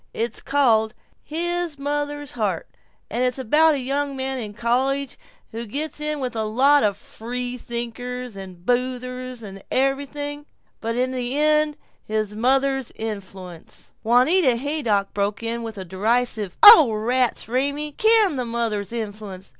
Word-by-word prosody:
It's 230 +1 -3
called 235 -5 +2 0.3
'His 345 0 -2
Mother's 290 0 -3
Heart,' 205 -8 -2 0.4
and 240 +4 0
it's 250 0 0
about 300 +5 +3
a - - -2
young 275 +2 -2
man 265 0 -3
in 210 -3 -7
college 265 +4 0 0.4
who 230 +1 -6
gets 300 +6 -4
in 300 0 -1
with 250 -3 -4
a 220 - -1
lot 270 +7 +4
of 200 -2 +1
free 245 +4 -6
thinkers 245 0 -6
and 185 -2 -10
boozers 250 0 -2
and 195 -1 -9
everything, 285 +2 -2 0.3
but 230 +1 -3
in 255 +1 0
the 255 +1 -3
end 305 0 +2 0.3
his 215 -1 -2
mother's 270 +2 +1
influence 190 -5 -8
" - - -46
Juanita 255 +5 +4
Haydock 235 -7 -1
broke 200 +2 -2
in 230 +1 -3
with 225 -2 -6
a 190 - -6
derisive, 210 +1 -1
"Oh 365 - +10
rats, 245 +3 0
Raymie! 280 +5 -1
Can 430 -2 +6
the 250 - -2
mother's 230 -4 -2
influence! 205 -4 -6
250 Hz, 145 wpm, -22 LUFS, 220-280 Hz, 0.4 s, Oh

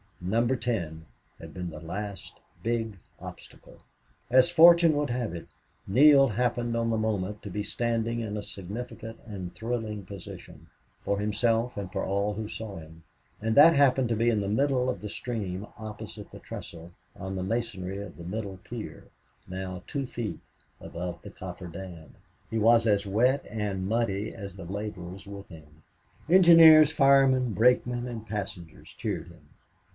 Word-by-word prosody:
Number 115 +8 +1
Ten 85 -10 -3 0.3
had - - -10
been 90 -1 -5
the 80 - -8
last 100 +5 -7 0.2
big 115 -3 -1 0.2
obstacle. - - -12 0.5
As 130 +5 +6
fortune 170 -1 +7
would 145 -1 0
have 120 -7 -2
it, 85 - -8 0.4
Neale 135 +5 +7
happened 120 +1 -1
on 115 0 0
the 110 - +1
moment 105 -2 -2
to 105 - -6
be 105 +2 -3
standing 115 +1 -1
in 105 -2 -3
a - - -3
significant 115 +4 -7
and 95 -5 -7
thrilling 110 -4 -4
position, 95 -2 -11 0.3
for 100 0 -1
himself 115 +3 0
and 95 -2 -5
for 95 -2 -2
all 100 +2 0
who 110 +1 -4
saw 110 -2 -7
him. 80 0 -12 0.4
And 110 +1 0
that 160 +3 +8
happened 135 -3 +4
to 115 - +1
be 115 +2 +2
in 110 -3 +1
the 100 - -3
middle 130 +3 +1
of - - -3
the 105 - -5
stream 100 -4 -4
opposite 110 -1 -8
the - - -10
trestle 85 +1 -9 0.2
on 95 0 -6
the 95 - -3
masonry 100 -3 -3
of 100 -4 -9
the 85 - -9
middle 100 +1 -5
pier, 115 +4 -8 0.4
now 95 -1 -6
two 140 -3 -3
feet 120 -4 -5 0.4
above 85 0 -6
the 100 - -10
coffer 95 -4 -8
dam. 85 -3 -10 0.3
He 115 - -2
was 115 +1 +5
as 100 -1 +2
wet 125 +7 +2
and 100 -3 -3
muddy 110 -2 -1
as 100 -4 -8
the 95 -3 -9
laborers 95 -1 -6
with 100 0 -9
him. 80 -2 -15 0.5
Engineer, 165 -3 +9
fireman, 135 -5 +4
brakemen, 125 +2 +2
and 115 -2 -7
passengers 95 -6 -6
cheered 90 -7 -4
him. 85 -4 -17
105 Hz, 160 wpm, -28 LUFS, 95-120 Hz, 0.5 s, Engineer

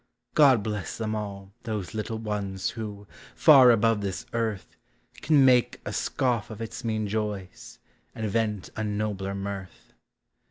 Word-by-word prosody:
God 135 -8 +5
bless 105 -3 -4
them 110 -1 -2
all, 100 -2 -6
those 110 -4 -4
little 110 +1 -3
ones, 100 -3 -3
who, 105 -3 -7 0.3
far 135 -5 +8
above 115 -2 +3
this 95 -2 -4
earth, 110 -4 -3 0.5
Can 145 -3 +4
make 125 -1 +4
a - - -4
scoff 125 -5 -1
of 110 - -8
its 115 +2 -6
mean 110 -2 -1
joys, 105 -3 -4 0.4
and 110 -1 -3
vent 105 -2 -1
a 110 - -2
nobler 105 -2 -2
mirth. 100 -1 -7
110 Hz, 145 wpm, -27 LUFS, 100-115 Hz, 0.5 s, far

